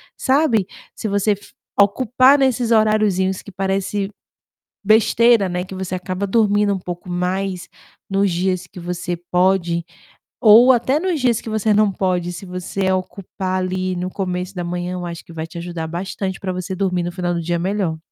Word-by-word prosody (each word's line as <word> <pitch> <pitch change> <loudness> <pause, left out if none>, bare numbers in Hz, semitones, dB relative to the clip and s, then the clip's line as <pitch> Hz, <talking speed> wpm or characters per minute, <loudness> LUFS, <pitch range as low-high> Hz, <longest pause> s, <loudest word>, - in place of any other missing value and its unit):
Sabe, 260 -8 +2 0.3
se 220 - -4
você 200 +1 +1
f 205 0 -4 0.3
ocupar 255 +6 +5
nesses 255 -3 +1
horariozinhos, 215 -4 +2
que 200 - -12
parece 195 +1 -1 0.7
besteira, 220 0 +4
né, 180 0 -2
que 190 - -9
você 185 -1 -4
acaba 185 +2 -3
dormindo 205 -1 +2
um 190 - -1
pouco 175 0 -7
mais 180 +1 -2 0.4
nos 195 0 +1
dias 185 +1 -1
que 180 - -13
você 175 0 -3
pode, 180 -2 +2 0.6
ou 235 +3 +8
até 260 +4 +2
nos 355 -4 -1
dias 240 -3 +1
que 225 - -7
você 215 0 +1
não 210 -1 +3
pode, 180 -2 -1
se 175 +3 -8
você 180 +1 -3
ocupar 185 0 -3
ali 185 0 -2
no 180 +1 -3
começo 180 0 -4
da 175 - -3
manhã, 175 +1 -3
eu 180 -1 -4
acho 170 -1 -7
que 170 - -13
vai 160 0 -4
te 170 - -11
ajudar 170 -2 -5
bastante 190 +3 -4
pra 185 -2 -3
você 185 +1 -4
dormir 180 -2 0
no 175 - -3
final 175 -1 -2
do 170 - -2
dia 170 +1 -1
melhor. 185 -3 -1
190 Hz, 180 wpm, -20 LUFS, 180-210 Hz, 0.7 s, ou